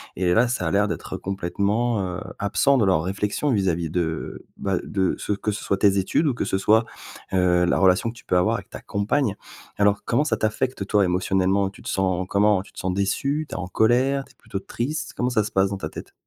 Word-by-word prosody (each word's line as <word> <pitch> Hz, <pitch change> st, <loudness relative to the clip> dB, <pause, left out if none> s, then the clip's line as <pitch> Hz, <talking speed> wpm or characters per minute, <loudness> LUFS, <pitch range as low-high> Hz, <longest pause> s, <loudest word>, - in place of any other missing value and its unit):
et 90 Hz, -1 st, +1 dB
là, 120 Hz, +5 st, +4 dB
ça 120 Hz, -7 st, -2 dB
a -, -, 0 dB
l'air 105 Hz, +1 st, +3 dB
d'être -, -, -5 dB
complètement, 100 Hz, +4 st, -1 dB
heu, -, -, -7 dB, 0.2 s
absent 135 Hz, +7 st, +2 dB
de 110 Hz, -, +3 dB
leur 95 Hz, -4 st, +2 dB
réflexion 105 Hz, +9 st, -1 dB
vis-à-vis 90 Hz, -7 st, 0 dB
de, 80 Hz, -2 st, -3 dB
bah, 95 Hz, -2 st, -1 dB
de 95 Hz, -3 st, 0 dB
ce -, -, -1 dB
que 105 Hz, +1 st, -2 dB
ce 105 Hz, -, -5 dB
soit 100 Hz, -, 0 dB
tes 100 Hz, 0 st, +3 dB
études 95 Hz, -, +1 dB
ou 140 Hz, -, +2 dB
que -, -, -2 dB
ce 95 Hz, -, 0 dB
soit, 110 Hz, +3 st, +4 dB, 0.5 s
heu, 90 Hz, -1 st, +3 dB
la 85 Hz, -, +2 dB
relation 95 Hz, +4 st, +3 dB
que 115 Hz, -, -8 dB
tu -, -, -15 dB
peux 90 Hz, -, +2 dB
avoir 90 Hz, -, +2 dB
avec -, -, -7 dB
ta -, -, -8 dB
compagne. 105 Hz, +2 st, 0 dB, 0.4 s
Alors, 100 Hz, 0 st, +2 dB
comment 130 Hz, +5 st, +2 dB
ça 120 Hz, -7 st, 0 dB
t'affecte, 110 Hz, -1 st, -1 dB
toi, 105 Hz, -1 st, +3 dB
émotionnellement? 95 Hz, +2 st, +1 dB
Tu 95 Hz, -, -15 dB
te -, -, -5 dB
sens 95 Hz, -1 st, 0 dB
comment? 100 Hz, -1 st, +3 dB
Tu -, -, -19 dB
te -, -, -10 dB
sens 95 Hz, -, -1 dB
déçu, 140 Hz, +10 st, 0 dB
tu -, -, -7 dB
es -, -, -3 dB
en 90 Hz, -, -4 dB
colère, 130 Hz, +7 st, +2 dB
tu 135 Hz, -, -21 dB
es -, -, -44 dB
plutôt -, -, -6 dB
triste? 130 Hz, +9 st, -4 dB
Comment 125 Hz, -, 0 dB
ça 110 Hz, -4 st, +2 dB
se 105 Hz, -, -5 dB
passe 95 Hz, 0 st, +2 dB
dans 100 Hz, -, -3 dB
ta 80 Hz, -5 st, -5 dB
tête? -, -, -10 dB
100 Hz, 240 wpm, -23 LUFS, 95-115 Hz, 0.5 s, là